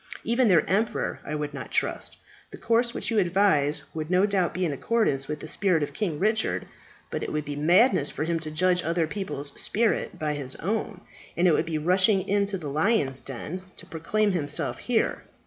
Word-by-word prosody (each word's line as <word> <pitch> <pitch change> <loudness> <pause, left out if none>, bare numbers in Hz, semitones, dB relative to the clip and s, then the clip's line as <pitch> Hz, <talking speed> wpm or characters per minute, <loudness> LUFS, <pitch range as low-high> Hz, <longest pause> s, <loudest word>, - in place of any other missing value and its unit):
Even 235 +1 +2
their 175 -6 +4
emperor 210 +6 0
I 150 - -4
would 150 -1 -4
not 140 - -7
trust. - - -1 0.3
The - - -10
course 235 +1 +1
which - - -2
you 220 - +3
advise 170 -6 +2
would 155 0 -4
no 185 +2 +4
doubt 195 -4 +1
be 185 0 -1
in 155 - -1
accordance 140 - 0
with 150 - -4
the - - -7
spirit 180 -3 +1
of - - -5
King 180 -8 -2
Richard; 215 +5 0 0.5
but - - -3
it - - -4
would 150 -1 -2
be 145 - -5
madness 170 - +4
for 150 - -3
him 165 +1 -1
to 155 -1 -6
judge 180 +3 +2
other 165 0 0
people's 155 -6 -4
spirit 225 0 0
by 150 -1 -1
his 140 -3 -4
own, 205 +1 -3 0.4
and 175 +2 +4
it 170 - +5
would 160 - +1
be 160 -2 -1
rushing 185 +5 +3
into 200 0 +1
the 160 -5 -7
lion's 145 - +1
den 145 +8 -6
to - - -7
proclaim 205 +6 0
himself 150 -5 +1
here. 240 -3 0
175 Hz, 200 wpm, -26 LUFS, 150-205 Hz, 0.5 s, it